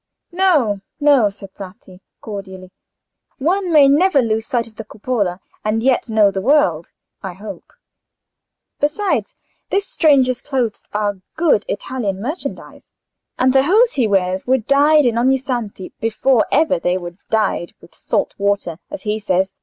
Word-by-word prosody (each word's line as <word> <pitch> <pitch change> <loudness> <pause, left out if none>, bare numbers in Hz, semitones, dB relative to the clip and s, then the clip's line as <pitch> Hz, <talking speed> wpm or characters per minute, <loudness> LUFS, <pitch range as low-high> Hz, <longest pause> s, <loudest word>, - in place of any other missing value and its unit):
"No, 310 - +2 0.2
no," 285 -7 +4
said 195 -1 -13
Bratti, 185 -1 -12 0.2
cordially; 190 -3 -8 0.7
"one 360 +5 0
may 295 -3 +7
never 300 +3 +4
lose 225 -2 0
sight 240 -2 0
of 220 0 -16
the 225 - -6
Cupola 205 -4 -2 0.2
and 215 +1 -1
yet 255 -2 +1
know 215 -2 +4
the 195 0 -3
world, 190 - +2 0.3
I 190 -3 -6
hope. 205 +4 -10 1.1
Besides, 400 +11 -1 0.3
this 400 0 0
stranger's 265 -5 +3
clothes 255 -6 -3
are 205 -1 -1 0.2
good 310 -11 +2
Italian 205 -4 -3
merchandise, 290 - -7 0.5
and 255 0 +3
the 265 - +5
hose 430 - +3
he 250 -5 +1
wears 190 -1 0
were 260 +1 +4
dyed 285 +5 +3
in 235 -1 +1
Ognissanti 245 -6 -1
before 225 +2 +1
ever 310 - +2
they 180 +2 0
were 175 -1 -7 0.2
dyed 215 -5 0
with - - -18
salt - - -2
water, 200 -4 -1
as 295 -1 -8
he 215 0 -1
says. 190 -1 0
230 Hz, 145 wpm, -18 LUFS, 200-280 Hz, 1.1 s, may